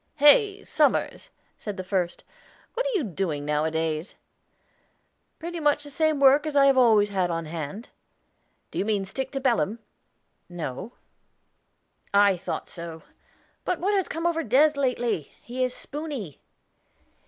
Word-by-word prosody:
"Hey, 395 Hz, -, +5 dB
Somers," -, -, +1 dB, 0.3 s
said 205 Hz, -2 st, -5 dB
the 185 Hz, -, -4 dB
first; 180 Hz, -2 st, -2 dB, 0.5 s
"what -, -, -1 dB
are -, -, -1 dB
you 360 Hz, -, +1 dB
doing 170 Hz, -, -3 dB
nowadays?" 155 Hz, +2 st, -1 dB, 1.2 s
"Pretty 340 Hz, +1 st, -5 dB
much 295 Hz, -1 st, +2 dB
the 290 Hz, -, -8 dB
same 310 Hz, 0 st, +1 dB
work 275 Hz, +1 st, +6 dB
that 300 Hz, -1 st, -2 dB
I 275 Hz, 0 st, +7 dB
always 225 Hz, -6 st, +4 dB
have 190 Hz, -3 st, 0 dB
on 165 Hz, -1 st, -2 dB
hand." 165 Hz, +7 st, -6 dB, 0.8 s
"Do -, -, -4 dB
you -, -, 0 dB
mean 210 Hz, -2 st, 0 dB
to 190 Hz, -, -9 dB
stick 265 Hz, +3 st, -3 dB
to 270 Hz, -, -1 dB
Belem?" 235 Hz, -5 st, +1 dB, 0.7 s
"No." 175 Hz, -, -6 dB, 1.2 s
"I 200 Hz, -1 st, +6 dB
thought 180 Hz, +1 st, -5 dB
so. 170 Hz, -2 st, -8 dB, 0.6 s
But 365 Hz, -, -1 dB
what 395 Hz, +4 st, +1 dB
has 385 Hz, -3 st, +1 dB
come 330 Hz, +1 st, -4 dB
over 335 Hz, -1 st, +1 dB
Des. 275 Hz, +6 st, +4 dB
lately? 245 Hz, -, -1 dB
He 255 Hz, +2 st, -3 dB
is 255 Hz, -, 0 dB
spoony." 285 Hz, -, -6 dB
235 Hz, 145 wpm, -26 LUFS, 175-295 Hz, 1.2 s, I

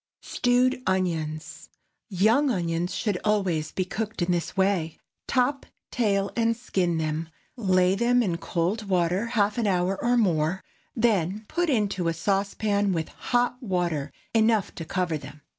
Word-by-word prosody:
STEWED 250 Hz, +1 st, +1 dB
ONIONS. 165 Hz, -5 st, -2 dB
✠ -, -, -35 dB, 0.3 s
Young 220 Hz, +9 st, +3 dB
onions 175 Hz, -4 st, -1 dB
should 205 Hz, -5 st, -1 dB
always 185 Hz, -8 st, 0 dB
be 185 Hz, -, -1 dB
cooked 215 Hz, 0 st, -3 dB
in 175 Hz, -, 0 dB
this 175 Hz, +1 st, -2 dB
way. 190 Hz, -5 st, +1 dB, 0.3 s
Top, 270 Hz, +2 st, +1 dB, 0.3 s
tail, 200 Hz, -4 st, +1 dB
and 230 Hz, -1 st, +1 dB
skin 180 Hz, -7 st, 0 dB
them, 160 Hz, +1 st, -2 dB, 0.3 s
lay 185 Hz, -5 st, +3 dB
them 240 Hz, +4 st, +3 dB
in 175 Hz, -5 st, -1 dB
cold 195 Hz, +6 st, -2 dB
water 180 Hz, +4 st, +1 dB
half 215 Hz, -1 st, +1 dB
an 225 Hz, -, +1 dB
hour 185 Hz, 0 st, 0 dB
or 245 Hz, +1 st, +3 dB
more, 180 Hz, -4 st, +1 dB, 0.3 s
then 215 Hz, -3 st, +1 dB
put 350 Hz, -1 st, 0 dB
into 200 Hz, -, 0 dB
a 165 Hz, -, 0 dB
saucepan 200 Hz, +3 st, 0 dB
with 165 Hz, -2 st, -2 dB
hot 245 Hz, +1 st, -1 dB
water 175 Hz, -, -1 dB, 0.2 s
enough 220 Hz, -2 st, +2 dB
to 165 Hz, -, -7 dB
cover 175 Hz, -3 st, -1 dB
them. 145 Hz, +2 st, -12 dB
195 Hz, 150 wpm, -26 LUFS, 170-225 Hz, 0.3 s, Young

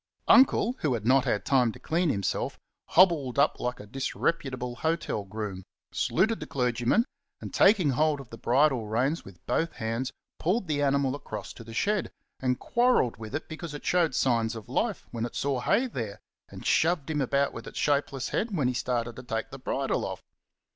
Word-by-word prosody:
Uncle, 255 Hz, -2 st, +5 dB
who 140 Hz, -5 st, +1 dB
had 110 Hz, -2 st, -5 dB
not 130 Hz, +2 st, +4 dB
had 105 Hz, -5 st, 0 dB
time 125 Hz, -4 st, +3 dB
to -, -, -12 dB
clean 170 Hz, +1 st, 0 dB
himself, 100 Hz, -, -1 dB, 0.3 s
hobbled 160 Hz, -9 st, +4 dB
up 140 Hz, +2 st, +3 dB
like 125 Hz, 0 st, -3 dB
a 105 Hz, -, -9 dB
disreputable 130 Hz, +1 st, -2 dB
hotel 160 Hz, -10 st, -1 dB
groom, 100 Hz, -2 st, -5 dB, 0.3 s
saluted 215 Hz, +5 st, +1 dB
the -, -, -6 dB
clergyman, 125 Hz, -, +1 dB, 0.3 s
and -, -, -8 dB
taking 195 Hz, -8 st, +5 dB
hold 150 Hz, +2 st, +2 dB
of 135 Hz, -4 st, -11 dB
the 115 Hz, -, -8 dB
bridle 125 Hz, -2 st, +2 dB
reins 130 Hz, +9 st, 0 dB
with 95 Hz, -3 st, -15 dB
both 165 Hz, 0 st, 0 dB
hands 115 Hz, +4 st, -3 dB, 0.3 s
pulled 190 Hz, +4 st, 0 dB
the 145 Hz, -2 st, 0 dB
animal 140 Hz, -1 st, +2 dB
across 110 Hz, -8 st, -6 dB
to -, -, -11 dB
the 115 Hz, -, -11 dB
shed, 210 Hz, -, +1 dB, 0.3 s
and 125 Hz, -1 st, 0 dB
quarrelled 240 Hz, -, +2 dB
with 110 Hz, +4 st, -7 dB
it 155 Hz, -, -4 dB
because 160 Hz, -1 st, -7 dB
it -, -, -9 dB
showed 170 Hz, -6 st, +2 dB
signs 115 Hz, -3 st, +1 dB
of 110 Hz, -2 st, -8 dB
life -, -, -1 dB
when 115 Hz, -1 st, -3 dB
it 120 Hz, -, -4 dB
saw 140 Hz, -2 st, 0 dB
hay 240 Hz, -, +2 dB
there 110 Hz, -, -5 dB, 0.3 s
and -, -, -10 dB
shoved 160 Hz, -3 st, +2 dB
him 150 Hz, -2 st, 0 dB
about 140 Hz, +2 st, +1 dB
with 115 Hz, -, -8 dB
its -, -, -9 dB
shapeless 140 Hz, -3 st, 0 dB
head 225 Hz, -, -1 dB
when 135 Hz, -5 st, +2 dB
he 125 Hz, -, 0 dB
started 120 Hz, -1 st, -2 dB
to 125 Hz, -, -8 dB
take 115 Hz, -2 st, -3 dB
the 135 Hz, -, -8 dB
bridle 135 Hz, +1 st, -1 dB
off. -, -, -5 dB
135 Hz, 195 wpm, -28 LUFS, 115-155 Hz, 0.3 s, Uncle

